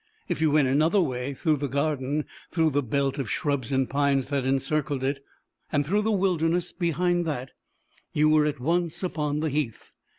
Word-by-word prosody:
If - - -2
you 160 - +4
went 145 -2 +4
another 155 +9 +3
way, 135 -4 -1
through 155 +3 +1
the 145 +1 -2
garden, 140 +1 -1 0.2
through 160 -2 +2
the 145 +1 +1
belt 140 +2 -1
of 130 -6 -3
shrubs 140 +1 -1
and 135 -1 +2
pines 140 -1 +1
that 140 -3 0
encircled 135 0 0
it, 140 +1 -1 0.5
and 145 -1 +1
through 205 +7 +1
the 215 - 0
wilderness 180 -3 +1
behind 175 0 +1
that, 135 -4 -3 0.6
you 150 +1 +3
were 155 -1 +4
at 145 -2 -3
once 170 +5 -1
upon 150 -4 -1
the 160 - 0
heath. 140 -6 -3
145 Hz, 185 wpm, -26 LUFS, 135-160 Hz, 0.6 s, you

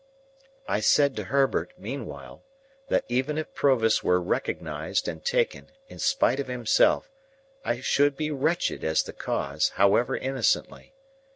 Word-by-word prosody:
I - - 0
said 140 +6 +3
to 105 - -3
Herbert, 135 +5 +1
meanwhile, - - -8 0.4
that - - +1
even 130 +5 -1
if 155 - -4
Provis 115 -6 +2
were 90 0 +3
recognised 90 - -2
and - - -5
taken, 485 0 -1 0.2
in - - -12
spite 270 - +2
of 140 - -3
himself, 125 - +2 0.5
I 120 +1 -2
should 140 +1 +2
be 155 0 -2
wretched 155 +5 -1
as 80 0 +2
the - - -9
cause, 70 +2 -1
however 100 +5 +3
innocently. 135 - -1
130 Hz, 135 wpm, -26 LUFS, 110-145 Hz, 0.5 s, said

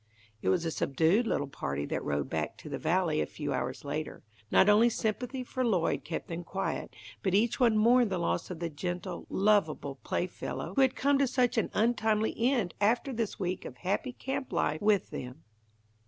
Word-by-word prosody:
It - - 0
was 160 - +2
a 165 - 0
subdued 165 - +2
little 145 - 0
party 70 - -4
that - - -3
rode 70 -2 -1
back - - -3
to - - -10
the - - -4
Valley, 165 -1 +1
a - - -1
few 150 -2 -4
hours 130 +3 -3
later. 155 +2 -4 0.3
Not - - +5
only 215 +3 +6
sympathy 245 +4 -2
for 255 +1 -3
Lloyd 190 -9 +1
kept - - -5
them 170 +1 -5
quiet, 195 +3 -3 0.3
but 190 -1 +1
each 235 +4 +2
one 230 -4 +4
mourned 235 +1 +5
the 190 - -1
loss 170 0 -1
of 180 - -5
the 170 0 -3
gentle, 175 +3 -4
lovable 170 -9 +1
playfellow 175 -1 -3
who 270 - +3
had 260 -1 +4
come 280 +1 +2
to 275 - +3
such 250 -1 +1
an - - -1
untimely 220 -1 +2
end 235 -7 +1
after 235 +6 +2
this 225 -3 -3
week 185 -1 -2
of 125 - -8
happy 200 - -2
camp 265 +1 -4
life 150 +1 0
with 205 -2 +2
them. 130 +5 -7
195 Hz, 195 wpm, -30 LUFS, 160-235 Hz, 0.3 s, only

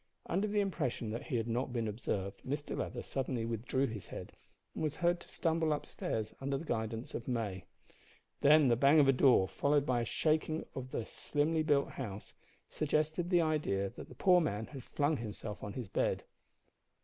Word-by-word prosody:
Under 195 +5 0
the 205 0 +2
impression 130 - -2
that 115 - -5
he 140 - -2
had 115 -1 0
not 120 +3 -1
been 115 -2 -1
observed, 100 -2 -3
Mr 145 +3 -3
Leather - - -3
suddenly 130 -3 -2
withdrew 115 +4 0
his 110 -6 -5
head, - - -7 0.4
and - - -5
was 155 -1 0
heard 175 +1 +2
to - - -14
stumble 160 -1 +1
up 150 - -1
stairs 110 -1 -3
under 135 0 0
the 165 - -7
guidance 115 -2 -3
of 115 - -5
May. 105 -7 -2 0.7
Then 150 0 +6
the 120 - +5
bang 140 +5 +6
of 140 - +6
a - - +7
door, 125 -7 +5
followed 145 +6 +2
by 125 -4 +1
a - - -1
shaking 155 +4 0
of 130 -1 -5
the 115 - -3
slimly 155 +2 0
built 145 -2 +2
house, 105 -6 -6 0.3
suggested 155 +3 0
the 175 -2 +5
idea 145 -12 0
that - - -10
the - - -12
poor 180 -2 +5
man 110 -9 -1
had 135 +1 -9
flung 145 +3 0
himself 105 -2 -6
on 100 - -5
his 120 -2 -5
bed. - - 0
135 Hz, 195 wpm, -34 LUFS, 115-155 Hz, 0.7 s, a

